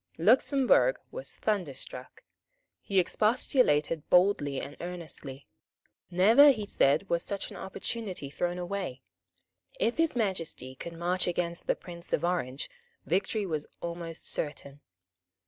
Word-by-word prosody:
Luxemburg 265 - +4
was - - -6
thunderstruck. 150 -10 -4 0.6
He 195 - -2
expostulated 180 - +2
boldly 180 -7 +3
and 145 - -7
earnestly. 160 -6 -7 0.6
Never, 220 +11 +7
he 220 -7 +1
said, 155 -1 +2
was 170 -1 +1
such 200 +1 -4
an - - -8
opportunity 190 -5 -5
thrown 175 +3 -1
away. 175 -8 -4 0.8
If 235 - +1
His 325 -4 +2
Majesty 170 - -2
would 170 - -6
march 175 +2 0
against 170 -1 -2
the - - +3
Prince 170 -1 -9
of 165 - +2
Orange, 145 -7 -1 0.4
victory 200 +4 0
was 155 -5 -3
almost 170 -1 -6
certain. 145 -1 -4
175 Hz, 120 wpm, -29 LUFS, 150-200 Hz, 0.8 s, Never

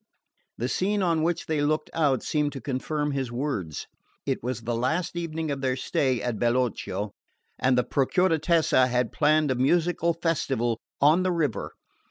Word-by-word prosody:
The 120 - -1
scene 200 +8 0
on 165 -3 +2
which 165 +1 0
they 155 -2 0
looked 155 +1 0
out 145 -6 +2
seemed 150 -1 0
to 135 - -5
confirm 145 +3 -2
his 135 -3 -2
words. 120 - -3 0.4
It - - -1
was 125 -1 -3
the 120 +1 -2
last 160 +10 -1
evening 160 -2 -3
of 140 -1 -3
their 130 -1 +1
stay 130 -1 0
at 120 -4 -2
Bellocchio, 120 -4 0 0.5
and 130 -1 +3
the 125 - +3
Procuratessa 160 -2 +2
had 125 -2 0
planned 155 -1 +3
a - - +1
musical 170 +3 +2
festival 135 -9 0 0.2
on 155 +5 +5
the 185 0 +1
river. 150 - -1
145 Hz, 165 wpm, -26 LUFS, 125-165 Hz, 0.5 s, on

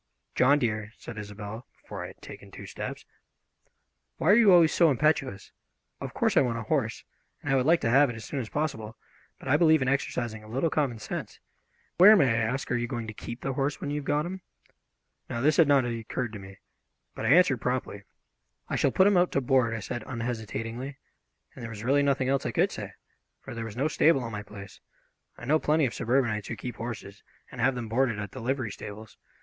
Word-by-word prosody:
"John, 140 +3 +4
dear," 110 -4 -2
said 115 -2 -8
Isobel, 105 +3 -8
before - - -7
I - - -5
had - - -15
taken - - -11
two - - -10
steps, - - -6 1.1
"why 170 - +3
are - - +7
you 220 -4 +6
always 170 -3 +6
so 170 -2 +5
impetuous? 135 -6 0 0.5
Of - - -7
course - - +1
I - - +6
want 120 -3 0
a 115 - -4
horse, 115 -2 -1 0.4
and 135 - 0
I - - +4
would 130 +1 +2
like 165 +1 +4
to 115 - +1
have 140 +2 +5
it 120 - -5
as 110 -2 -8
soon 140 - -4
as 115 -4 -5
possible, 115 -8 -3 0.4
but - - -12
I 140 +3 +4
believe 160 -1 +5
in - - -2
exercising 120 -5 -2
a - - -13
little 135 +7 0
common 140 -6 0
sense. 110 - -6 0.6
Where, 205 +4 +10
may 135 - +4
I - - 0
ask, 120 +5 -1
are - - +2
you 120 0 -2
going 120 -2 -4
to 110 - -7
keep 120 +3 -8
the 135 - -2
horse 140 +2 -1
when 145 - -4
you 145 - -1
have 145 - -5
got 145 +2 +1
him?" 185 +2 -6 0.9
Now, 120 - -3
this 150 +5 +2
had 165 -4 +6
not 140 -3 +4
occurred 115 0 -4
to 105 - -6
me, 95 0 -12 0.6
but - - -7
I - - +1
answered 165 -8 +4
promptly. 125 -5 -2 0.7
"I - - -1
shall - - +3
put 190 - +4
him 205 -2 +4
out 175 0 +3
to - - +2
board," 125 -3 +2
I 110 - -5
said 120 +3 -5
unhesitatingly, 115 +2 -4 0.6
and - - -11
there 115 - -6
was 110 -1 -8
really 140 +4 +3
nothing 140 -2 +1
else 135 0 +1
I - - -2
could - - +2
say, - - -7 0.5
for - - -9
there 115 -1 -5
was 110 0 -8
no 140 +4 +1
stable 155 -3 +3
on 115 - -5
my 105 -1 -4
place. 100 -2 -11 0.6
I - - -9
know 155 +5 +3
plenty 155 0 +2
of 120 - -2
suburbanites 120 -4 0
who 115 - -4
keep 120 0 -7
horses 110 -4 -7 0.3
and - - -6
have 135 - +3
them 120 -2 -4
boarded 120 -1 +1
at 105 -1 -5
the 130 - -8
livery 130 -2 -2
stables. 105 +2 -9
125 Hz, 230 wpm, -27 LUFS, 110-145 Hz, 1.1 s, Where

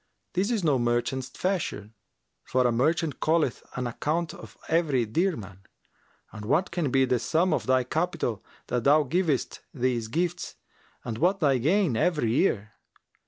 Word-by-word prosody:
This 190 +4 +1
is 225 -6 0
no 145 -5 +3
merchant's 120 +2 0
fashion, 145 - -3 0.5
for 130 0 +1
a 120 - +4
merchant 150 +5 0
calleth 155 -5 +1
an 125 - -2
account 155 +7 -1
for - - -12
every 150 -7 +2
dirham, 110 - -2 0.7
and 105 - -9
what 175 - +1
can 170 -5 -1
be 135 +1 +3
the 125 -1 +1
sum 170 +9 +1
of - - -1
thy 130 -1 +3
capital 155 - -2 0.2
that 125 -2 -1
thou 150 +2 +5
givest 155 -1 0 0.2
these 120 -3 0
gifts 175 +8 -2 0.5
and 115 -2 -4
what 185 +5 +2
thy 140 -6 +3
gain 165 - +2
every 145 -2 +1
year? 110 - +1
140 Hz, 155 wpm, -27 LUFS, 120-170 Hz, 0.7 s, thou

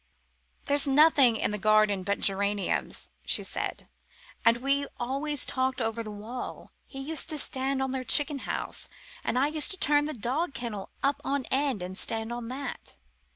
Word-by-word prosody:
"There's 285 0 +3
nothing 275 -4 +6
in 215 - 0
the 210 - -2
garden 215 -1 +4
but 200 +2 -1
geraniums," 200 0 0
she - - +1
said, - - -4 0.6
"and 230 +1 +5
we 275 +3 +1
always 275 +4 -1
talked 260 0 -1
over 225 -1 -1
the 220 - -6
wall 215 +4 -7 0.2
he 270 - -9
used 310 +4 -1
to 310 - +3
stand 265 -1 -1
on 265 - -2
their 260 -1 -2
chicken 290 +2 +4
house, - - -3 0.3
and 245 - 0
I 265 - +4
used 305 +3 -1
to 380 - -1
turn 295 -3 +3
our 305 - -4
dog 265 - -2
kennel 215 -5 -5
up 280 +1 +1
on 275 -3 -1
end 265 -7 +1
and 185 +1 -6
stand 225 +3 -2
on 240 -1 -5
that. 270 +3 -6
260 Hz, 175 wpm, -28 LUFS, 225-280 Hz, 0.6 s, nothing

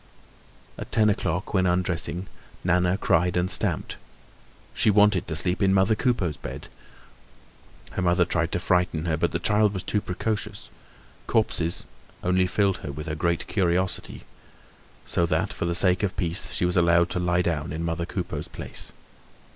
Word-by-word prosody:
At - - -7
ten 110 -2 +4
o'clock, 95 -1 -2
when 95 -2 +3
undressing, 90 0 0 0.4
Nana 90 +1 +2
cried 90 -2 +2
and 90 +1 +1
stamped. - - -2 0.8
She - - +2
wanted 105 -2 +4
to 80 - -3
sleep 90 +5 0
in 95 -1 +4
mother 95 +3 +4
Coupeau's 105 - 0
bed. - - -8 1.2
Her - - -3
mother 90 0 +3
tried 85 0 -1
to - - +1
frighten 90 -3 +1
her; 80 -2 +1
but - - 0
the - - 0
child 105 -1 +2
was 95 - -3
too 105 +2 0
precocious. 105 +2 -4 0.6
Corpses 85 -6 0 0.4
only 90 +1 +2
filled 100 0 +1
her 70 - -6
with 75 +3 -7
a 75 - -2
great 85 +2 0
curiosity; 90 -1 -1 0.8
so 85 - +1
that, - - 0
for - - -3
the 85 0 0
sake 90 0 +4
of 100 -3 -2
peace, 85 0 -1
she 90 - 0
was 90 - 0
allowed 85 -1 +4
to - - -1
lie 90 0 +1
down 80 -3 -2
in 80 +2 -4
mother 85 +1 -2
Coupeau's 90 -2 -4
place. - - -6
90 Hz, 165 wpm, -25 LUFS, 85-95 Hz, 1.2 s, ten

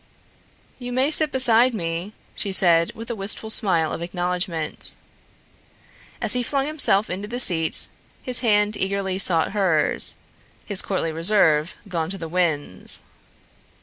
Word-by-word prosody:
"You 245 -1 -8
may 260 +4 -1
sit 310 -1 +6
beside 250 -1 +3
me," 170 +2 -5 0.2
she 200 - -3
said 170 -3 +3
with 230 +2 -7
a - - -5
wistful 215 +2 -2
smile 170 -8 +2
of - - -7
acknowledgment. 175 -2 0 1.2
As - - +1
he 250 - -1
flung 275 +2 -3
himself 275 -9 -1
into 195 +3 -6
the 240 +3 -6
seat, 165 -9 +3 0.4
his 250 -2 +3
hand 210 -3 0
eagerly 190 -1 -3
sought 165 -4 +2
hers, 185 -7 -1 0.5
his 200 -3 -2
courtly 185 -4 -4
reserve 165 -2 +3
gone 165 -4 -4
to 195 - -3
the 165 - -8
winds. 155 - +1
195 Hz, 140 wpm, -21 LUFS, 170-225 Hz, 1.2 s, sit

